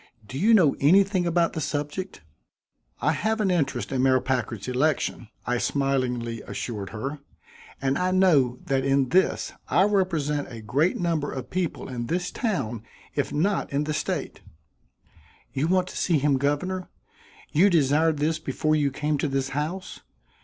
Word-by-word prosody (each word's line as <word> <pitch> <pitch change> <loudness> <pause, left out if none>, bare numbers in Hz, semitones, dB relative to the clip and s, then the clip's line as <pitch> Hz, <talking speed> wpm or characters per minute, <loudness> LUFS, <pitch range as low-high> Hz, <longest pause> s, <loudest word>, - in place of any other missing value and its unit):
Do 130 - -5
you 220 +4 +5
know 165 -9 +4
anything 185 +4 +4
about 170 0 +2
the 160 - -3
subject?" 150 +6 -4 0.8
"I - - +3
have 220 +1 -1
an 200 -3 +2
interest 165 -7 -1
in 130 -1 0
Mayor 130 0 +4
Packard's 120 -5 -2
election," 130 -2 0 0.2
I 125 +1 0
smilingly 125 -5 -1
assured 105 -5 -5
her; 135 +7 -5 0.6
"and 135 +2 0
I 180 0 +1
know 160 -10 +3
that 135 -1 0
in 135 -1 +2
this 185 +1 +2
I 190 - +4
represent 165 -9 0
a 115 -2 -8
great 145 +10 +1
number 165 -5 -1
of 130 -2 -6
people 180 -3 -2
in 120 -2 -4
this 175 +5 -1
town 120 - -2 0.3
if - - -1
not 195 +7 0
in 140 +1 0
the 155 0 -2
state." - - -3 1.1
"You 140 +4 0
want 185 +1 +2
to - - -8
see 170 -4 +2
him 140 -1 +2
governor? 180 +7 -1 0.6
You 185 +7 +5
desired 155 -1 +3
this 155 +2 0
before 155 0 0
you 145 -2 +2
came 150 +2 -1
to 150 - 0
this 135 -1 -1
house? 155 +7 -4
150 Hz, 160 wpm, -25 LUFS, 135-180 Hz, 1.1 s, you